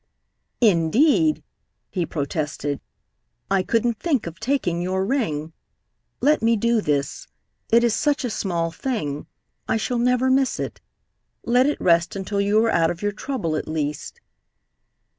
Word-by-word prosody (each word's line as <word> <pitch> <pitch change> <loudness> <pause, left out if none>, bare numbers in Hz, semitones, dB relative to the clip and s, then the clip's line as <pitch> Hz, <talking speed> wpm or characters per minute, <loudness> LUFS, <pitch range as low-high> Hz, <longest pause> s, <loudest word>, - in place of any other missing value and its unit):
"Indeed," 245 - +3 0.5
he 175 -4 -1
protested, 145 -1 -3 0.7
"I 195 -1 +3
couldn't 230 +3 0
think 295 -9 0
of 170 0 -8
taking 220 -9 0
your 190 +1 -1
ring. 165 - -1 0.7
Let 295 +4 +3
me 230 +1 +3
do 235 +1 +2
this. 145 -3 -2 0.4
It 235 +1 +5
is 235 -2 +3
such 290 0 +1
a 245 - -2
small 170 -5 -1
thing. 165 - -3 0.4
I - - +1
shall 240 +2 -1
never 250 +2 +2
miss 265 0 +2
it. - - -5 0.6
Let 250 +3 +4
it 295 - -1
rest 170 0 +2
until 200 +1 -2
you 205 +1 +2
are 225 - +2
out 165 -1 +3
of 175 +3 -5
your 205 - +1
trouble, 205 - -3
at - - -3
least." 150 -2 -4
205 Hz, 145 wpm, -23 LUFS, 165-245 Hz, 0.7 s, It